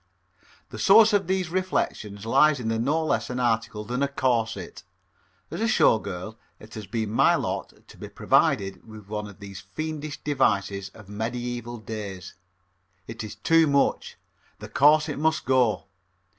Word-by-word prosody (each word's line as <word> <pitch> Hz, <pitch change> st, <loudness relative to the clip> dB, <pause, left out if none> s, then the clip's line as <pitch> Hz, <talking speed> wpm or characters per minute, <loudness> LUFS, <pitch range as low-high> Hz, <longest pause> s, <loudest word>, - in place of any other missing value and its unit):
The -, -, -9 dB
source 220 Hz, -1 st, +6 dB
of 195 Hz, -3 st, +2 dB
these 185 Hz, -2 st, -1 dB
reflections 110 Hz, -, -2 dB
lies 140 Hz, +4 st, +4 dB
in 115 Hz, -2 st, -3 dB
no 155 Hz, +5 st, 0 dB
less 115 Hz, -6 st, -1 dB
an 125 Hz, 0 st, -3 dB
article 115 Hz, -3 st, -1 dB
than 125 Hz, +4 st, -3 dB
a 140 Hz, -, +2 dB
corset. 125 Hz, -5 st, -2 dB, 0.7 s
As 170 Hz, +6 st, -5 dB
a 225 Hz, -, +2 dB
Show 115 Hz, -, +4 dB
Girl, 100 Hz, +4 st, -7 dB, 0.2 s
it 110 Hz, 0 st, -14 dB
has 110 Hz, -2 st, -8 dB
been 110 Hz, -3 st, -3 dB
my 115 Hz, -, +4 dB
lot -, -, -5 dB
to -, -, -15 dB
be -, -, -8 dB
provided 95 Hz, 0 st, +1 dB
with 105 Hz, -2 st, -12 dB
one 105 Hz, -1 st, -4 dB
of 100 Hz, -, -13 dB
these 100 Hz, -2 st, -9 dB
fiendish 155 Hz, -1 st, -4 dB
devices 100 Hz, -9 st, 0 dB
of 110 Hz, -3 st, -14 dB
medieval 120 Hz, +3 st, -4 dB
days. 105 Hz, -4 st, -7 dB, 0.7 s
It 115 Hz, 0 st, -7 dB
is 110 Hz, -, -7 dB
too 165 Hz, -1 st, +3 dB
much. 140 Hz, -1 st, 0 dB, 0.4 s
The -, -, -10 dB
corset 150 Hz, +1 st, +3 dB
must 160 Hz, +1 st, 0 dB
go. 125 Hz, -6 st, +2 dB
120 Hz, 155 wpm, -25 LUFS, 105-150 Hz, 0.7 s, source